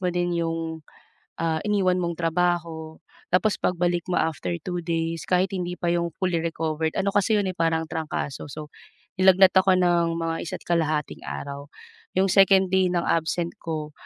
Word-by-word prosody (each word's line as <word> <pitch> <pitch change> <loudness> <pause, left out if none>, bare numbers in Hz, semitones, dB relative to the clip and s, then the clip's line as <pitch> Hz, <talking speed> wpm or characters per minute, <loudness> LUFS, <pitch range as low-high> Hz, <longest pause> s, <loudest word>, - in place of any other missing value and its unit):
mo 180 - 0
din 175 -1 0
yung, 165 -1 -3 0.6
ah, 160 -1 0
iniwan 195 -3 +2
mong 170 -1 -2
trabaho. 165 -2 -1 0.3
Tapos 185 +3 +3
pagbalik 175 -1 0
mo - - +1
after 150 - -2
2 180 -1 -3
days 165 -1 -2
kahit 185 +1 +2
hindi 180 0 -3
pa 175 - 0
yung 170 0 0
fully 180 -3 +1
recovered, 160 -1 -1
ano 195 +1 +1
kasi 205 +2 +2
'yon, 195 - -1
eh, 185 - -9
parang 165 -1 +1
trangkaso. 155 -4 -4
So, 150 +1 -8 0.5
nilagnat 190 0 +6
ako 190 0 +5
ng 170 -2 +2
mga 165 0 -1
isa't - - -6
kalahating 155 -3 0
araw. 140 0 -6 0.5
Yung 195 +1 +3
second 195 -1 +5
day 190 -1 +3
ng 175 -1 +1
absent 170 +1 0
ko, 155 -2 -4
170 Hz, 165 wpm, -25 LUFS, 160-180 Hz, 0.6 s, nilagnat